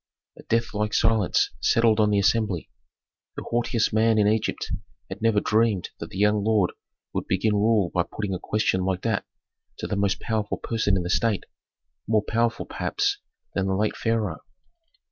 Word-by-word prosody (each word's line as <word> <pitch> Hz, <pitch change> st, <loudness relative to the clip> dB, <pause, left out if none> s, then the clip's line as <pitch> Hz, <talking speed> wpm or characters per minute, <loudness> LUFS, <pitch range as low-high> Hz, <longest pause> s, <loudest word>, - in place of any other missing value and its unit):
A -, -, -13 dB
deathlike 105 Hz, -2 st, -1 dB
silence 110 Hz, -4 st, +2 dB
settled 115 Hz, -, +3 dB
on 105 Hz, -1 st, +4 dB
the 105 Hz, -, +2 dB
assembly. 100 Hz, -3 st, +1 dB, 0.6 s
The -, -, -5 dB
haughtiest 120 Hz, -2 st, 0 dB
man 110 Hz, 0 st, +3 dB
in 105 Hz, -, +4 dB
Egypt 110 Hz, +1 st, -1 dB, 0.4 s
had -, -, -7 dB
never 115 Hz, -2 st, +3 dB
dreamed 110 Hz, -3 st, +1 dB
that -, -, -6 dB
the -, -, -9 dB
young 105 Hz, 0 st, +3 dB
lord 105 Hz, -4 st, +2 dB, 0.4 s
would -, -, -3 dB
begin 100 Hz, +4 st, +1 dB
rule 105 Hz, -3 st, +2 dB
by 90 Hz, -, +2 dB
putting 100 Hz, +3 st, -4 dB
a 90 Hz, -, -3 dB
question 105 Hz, -3 st, 0 dB
like 95 Hz, -1 st, -1 dB
that -, -, 0 dB, 0.5 s
to -, -, -5 dB
the -, -, -2 dB
most 100 Hz, 0 st, +1 dB
powerful 110 Hz, -2 st, -2 dB
person 110 Hz, -4 st, 0 dB
in 90 Hz, -, -1 dB
the 85 Hz, -, -4 dB
state, 110 Hz, -1 st, +1 dB, 0.6 s
more 110 Hz, -1 st, +2 dB
powerful, 115 Hz, +1 st, 0 dB
perhaps, -, -, -1 dB, 0.3 s
than 95 Hz, -1 st, 0 dB
the 95 Hz, -, +1 dB
late 105 Hz, +2 st, 0 dB
pharaoh. 110 Hz, -7 st, -1 dB
105 Hz, 170 wpm, -25 LUFS, 100-115 Hz, 0.6 s, on